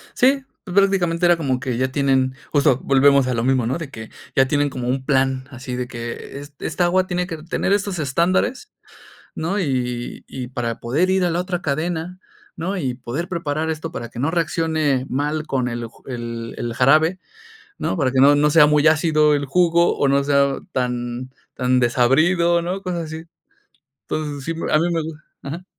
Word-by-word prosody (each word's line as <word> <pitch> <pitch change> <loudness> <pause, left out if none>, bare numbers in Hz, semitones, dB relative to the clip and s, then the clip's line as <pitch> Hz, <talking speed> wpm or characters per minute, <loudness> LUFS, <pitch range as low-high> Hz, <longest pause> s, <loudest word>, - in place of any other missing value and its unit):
Sí, 270 +2 +3 0.2
pues, 180 -3 -7
prácticamente 185 -4 +3
era 175 -1 +5
como 130 -5 -1
que 125 -2 -3
ya 130 +1 0
tienen, 130 -1 +1 0.2
justo 140 -3 +3
volvemos 140 -1 +4
a 125 - 0
lo 115 0 -1
mismo, 130 -2 +2
¿no? 125 +6 -1
De 165 -4 -6
que 110 -4 -9 0.3
ya 135 0 +4
tienen 145 +1 +1
como 125 -2 -5
un 130 +1 -1
plan 135 -2 +1
así 130 -1 -6
de 125 0 -3
que 120 +2 -7
e - - -8 0.2
esta 175 +3 0
agua 185 +1 +2
tiene 180 0 -1
que 165 -2 -5
tener 185 +3 0
estos 200 -4 -1
estándares, 185 - 0 0.6
¿no? 180 +6 -1
Y 125 -6 -2
y 125 -2 -6
para 120 -3 -3
poder 150 +11 0
ir 190 -1 +2
a 175 - +1
la 170 - 0
otra 180 -1 -3
cadena, 165 +4 -2 0.4
¿no? 185 +5 -3
Y 130 -8 -2
poder 130 +7 -5
preparar 160 -3 -2
esto 160 +1 -4
para 120 -7 -6
que 120 - -9
no 145 +4 +1
reaccione 160 -5 0
mal 150 +3 -2
con 130 -2 0
el 120 -1 -4
ju - - -22
el 115 -2 -5
el 120 -1 -3
jarabe, 155 +8 +4 0.6
¿no? - - -1
Para 135 -5 +1
que 130 - +3
no 145 +1 +7
no 150 +1 +3
sea 150 -1 +7
muy 150 +1 +3
ácido 155 -1 +4
el 140 -1 -1
jugo 170 +3 +3
o 140 - +2
no 140 0 +3
sea 140 -1 +2
tan 125 0 -3 0.2
tan 125 0 +2
desabrido, 165 +8 +3
¿no? 185 +3 -3
Cosas 175 -3 -3
así. 160 +1 -7 0.8
Entonces, 145 -3 -3
sí, 165 - -2 0.2
a 155 - +4
mi 170 - +1
me 165 - 0
gu 160 +1 -5 0.3
ajá. 165 +6 -6
145 Hz, 195 wpm, -21 LUFS, 130-170 Hz, 0.8 s, no